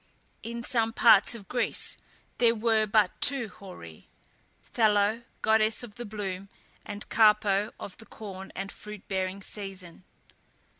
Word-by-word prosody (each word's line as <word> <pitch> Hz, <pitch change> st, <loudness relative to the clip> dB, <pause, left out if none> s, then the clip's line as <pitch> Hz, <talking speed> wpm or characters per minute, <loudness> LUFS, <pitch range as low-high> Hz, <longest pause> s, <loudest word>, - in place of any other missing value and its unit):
In 235 Hz, +1 st, -6 dB
some 225 Hz, -2 st, +1 dB
parts 230 Hz, -1 st, +6 dB
of 205 Hz, -5 st, -11 dB
Greece 245 Hz, -2 st, +1 dB, 0.4 s
there 235 Hz, -1 st, +4 dB
were 220 Hz, -1 st, +2 dB
but 205 Hz, -2 st, +3 dB
two 265 Hz, -5 st, +4 dB
Horæ, 130 Hz, -, -12 dB, 0.7 s
Thallo, 215 Hz, 0 st, +3 dB, 0.2 s
goddess 220 Hz, +1 st, +3 dB
of 225 Hz, -4 st, -9 dB
the 240 Hz, +2 st, -7 dB
bloom, 200 Hz, -2 st, -5 dB, 0.3 s
and 205 Hz, 0 st, -7 dB
Carpo, 210 Hz, -2 st, +3 dB
of 190 Hz, -, -8 dB
the 225 Hz, -, -13 dB
corn 195 Hz, -3 st, -9 dB
and 195 Hz, +1 st, -5 dB
fruit 210 Hz, -2 st, -10 dB
bearing 190 Hz, 0 st, -2 dB
season. 190 Hz, -4 st, -8 dB
210 Hz, 135 wpm, -28 LUFS, 195-225 Hz, 0.7 s, parts